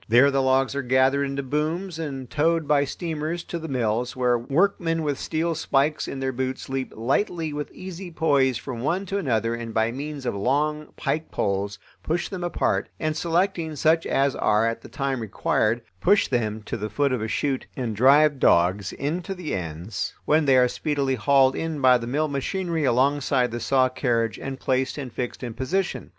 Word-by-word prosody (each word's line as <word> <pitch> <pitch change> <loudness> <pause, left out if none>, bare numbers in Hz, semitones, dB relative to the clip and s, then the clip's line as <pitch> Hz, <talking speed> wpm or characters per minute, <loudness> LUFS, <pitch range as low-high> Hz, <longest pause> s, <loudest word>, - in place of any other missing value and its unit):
There 125 +5 +6
the 135 0 +2
logs 130 +1 +2
are 140 - -1
gathered 130 +2 +3
into 140 0 -3
booms 160 +6 -2
and 135 -5 -5
towed 160 +2 +1
by 145 -1 +3
steamers 160 +2 -4
to 170 - -5
the 160 - -6
mills, 120 -3 -1
where 125 -1 +2
workmen 165 +6 +1
with 145 -3 -1
steel 165 +1 -1
spikes 150 -1 0
in 135 - -5
their 135 0 -1
boots 130 +1 -4
leap 135 -1 -3
lightly 155 - 0
with 150 0 -4
easy 185 0 -8
poise 140 -6 +2
from 115 0 -6
one 175 +9 0
to 200 +1 -2
another 115 - 0
and 115 -1 -6
by 110 +1 +2
means 140 +1 -6
of 120 - 0
long 150 +8 0
pike 160 +1 -2
poles 100 +1 -1 0.2
push 170 +2 -2
them 185 -2 -5
apart 175 - 0
and, 155 -1 -1
selecting 170 -1 0
such 160 +3 +2
as 135 0 +1
are 110 +1 +2
at 115 0 -2
the - - -12
time 135 -2 -2
required, 110 +1 0 0.2
push 200 - +4
them 110 -4 -1
to 115 - -4
the 105 0 -4
foot 140 +6 +1
of 125 - -1
a 110 - -2
chute 130 +5 -1
and 120 -5 -2
drive 140 +5 +5
dogs 90 +1 +3
into 170 +7 -3
the 180 -4 -5
ends, 90 +3 -4
when 155 0 +3
they 135 -2 +5
are 125 0 +5
speedily 135 +2 -1
hauled 130 +2 +4
in 160 -2 -3
by 130 -2 +5
the 115 - -6
mill 150 +5 0
machinery 165 +4 -2
alongside 130 0 +2
the 120 - -3
saw 130 +2 +3
carriage 120 -3 -1
and 135 0 -5
placed 130 +2 0
and 130 -5 -6
fixed 125 +2 -4
in 120 -2 -4
position. 175 - -2
135 Hz, 190 wpm, -24 LUFS, 120-155 Hz, 0.2 s, There